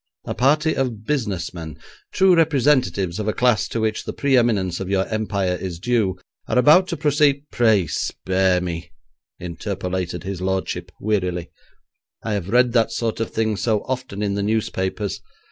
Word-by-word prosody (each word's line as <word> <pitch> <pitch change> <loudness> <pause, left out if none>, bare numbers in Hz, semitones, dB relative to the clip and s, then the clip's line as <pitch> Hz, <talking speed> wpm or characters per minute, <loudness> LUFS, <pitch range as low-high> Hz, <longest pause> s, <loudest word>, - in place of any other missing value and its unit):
A - - -3
party 150 +5 +2
of 120 -5 -2
business 105 - -2
men, 80 -4 -8 0.3
true 190 0 +4
representatives 130 - +2
of 105 - -3
a 105 - +1
class 120 -3 +2
to 115 - -3
which 110 -1 -1
the - - -5
pre 140 -1 +1
eminence 100 -8 +2
of 95 - -4
your 95 -1 +1
Empire 100 -4 -1
is 90 -2 -5
due, 110 -1 0 0.3
are - - 0
about 155 +8 +6
to 170 - -3
proceed 145 -2 +2
' - - -52
'Pray 110 -6 +3
spare 95 +3 0
me,' 85 -2 -5 0.5
interpolated 90 -1 -4
his 95 -1 -5
lordship 95 -2 -2
wearily, 90 -5 -1 0.7
'I 110 - -2
have 100 -2 -3
read 125 +2 +4
that 115 -2 +2
sort 115 -1 -2
of 115 - -1
thing 110 -1 0
so 105 0 0
often 125 -6 -4
in 100 -1 0
the 100 - -1
newspapers. 100 -1 -2
105 Hz, 170 wpm, -22 LUFS, 95-125 Hz, 0.7 s, about